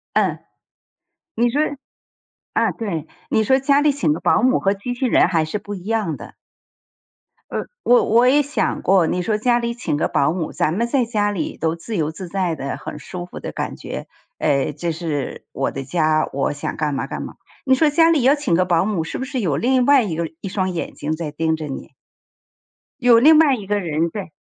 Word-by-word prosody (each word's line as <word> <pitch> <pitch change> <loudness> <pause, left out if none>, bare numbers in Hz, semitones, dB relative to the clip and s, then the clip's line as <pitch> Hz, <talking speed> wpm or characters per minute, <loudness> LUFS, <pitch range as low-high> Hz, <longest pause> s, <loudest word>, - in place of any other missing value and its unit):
嗯。 - - +2 1.0
你 240 0 +3
说 285 +5 0 0.9
啊， - - +2
对， 170 - -4 0.2
你 220 - +2
说 265 +5 +4
家 280 +1 +3
里 295 -1 +3
请 170 - +1
个 160 - -3
保 - - +3
姆 255 +1 +3
和 195 +1 +2
机 220 +5 -5
器 255 +1 -1
人 - - +4
还 165 -3 +1
是 210 - -3
不 205 0 -7
一 180 -1 -9
样 215 -8 -1
的。 - - -11 1.2
呃， - - -2 0.2
我 245 0 +5
我 240 +3 +4
也 290 +2 +5
想 290 +1 -1
过， 185 -4 +3
你 180 - -1
说 210 +3 0
家 240 +2 +2
里 235 0 -2
请 235 -11 -2
个 - - +1
保 140 +2 +2
姆， 170 -2 -3
咱 155 - 0
们 235 +5 0
在 255 0 +2
家 210 -3 0
里 170 -6 -4
都 160 +1 -1
自 195 +6 -5
由 155 -2 0
自 175 +2 -8
在 185 -3 -1
的， 140 -2 -4
很 - - -7
舒 175 +3 -7
服 180 - -10
的 - - -5
感 - - -4
觉， - - -7 0.3
诶， 140 -1 +1
这 165 +3 -3
是 155 -5 -4
我 - - -1
的 135 - -5
家， 155 +2 +1
我 135 +1 -1
想 145 - -5
干 150 -2 -1
嘛 - - -3
干 - - -5
嘛。 - - -7 0.3
你 260 - +5
说 305 +3 +3
家 325 +2 +4
里 310 -5 +3
要 275 +3 +5
请 285 - 0
个 185 - +3
保 175 0 +2
姆 200 -6 -1
是 165 - -5
不 260 - -3
是 265 -2 -3
有 150 -8 0
另 250 +6 +2
外 280 -2 +6
一 185 -8 -2
个 165 -1 -2
一 - - -6
双 190 -1 -1
眼 170 - -4
睛 150 - -4
在 160 -1 -4
盯 160 0 0
着 155 - -5
你？ 135 - -7 1.1
有 245 -2 +6
另 305 +5 +7
外 300 -4 +5
一 210 -5 -8
个 205 0 +1
人， 165 -1 -1
对。 190 -2 -7
195 Hz, 240 characters per minute, -21 LUFS, 160-245 Hz, 1.2 s, 另